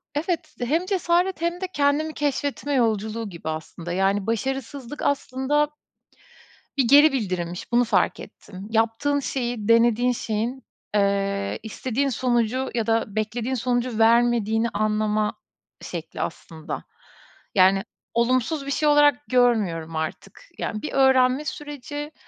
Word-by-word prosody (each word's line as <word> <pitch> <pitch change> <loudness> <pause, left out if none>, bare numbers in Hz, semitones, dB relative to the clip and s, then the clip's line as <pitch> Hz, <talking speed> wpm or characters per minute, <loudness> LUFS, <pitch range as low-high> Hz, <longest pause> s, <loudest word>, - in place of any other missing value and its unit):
evet 320 0 -2
hem 310 +9 +1
cesaret 365 -2 +1
hem 340 +2 -1
de - - 0
kendimi 290 +2 +1
keşfetme 285 0 -2
yolculuğu 220 -3 0
gibi 170 -3 -7
aslında, 160 +2 -5
yani, 195 +2 +1
başarısızlık 265 +3 -3
aslında 285 +1 +1 1.1
bir 265 -4 +2
geri 290 +3 +7
bildirimmiş, 185 -6 -3
bunu 240 +1 +4
fark 235 - +1
ettim. 195 -1 -11
Yaptığın 225 +6 +1
şeyi, 240 -5 -3
denediğin 235 +1 +4
şeyin, 235 +3 -3 0.3
eee, 200 0 0
istediğin 255 +5 -2
sonucu 250 0 0
ya 230 -2 0
da 225 -2 0
beklediğin 225 +4 -1
sonucu 245 -1 -1
vermediğini 230 -1 +3
anlama 215 0 0 0.5
şekli - - -7
aslında. 160 -2 -5 0.7
Yani, 195 +1 +5 0.3
olumsuz 255 +5 +1
bir - - -3
şey 300 +2 +1
olarak 290 -2 +5
görmüyorum 205 -11 +2
artık. 160 - -5 0.2
Yani, 215 - -3
bir - - -4
öğrenme 265 +1 +4
süreci. 295 0 -6
240 Hz, 120 wpm, -24 LUFS, 215-280 Hz, 1.1 s, geri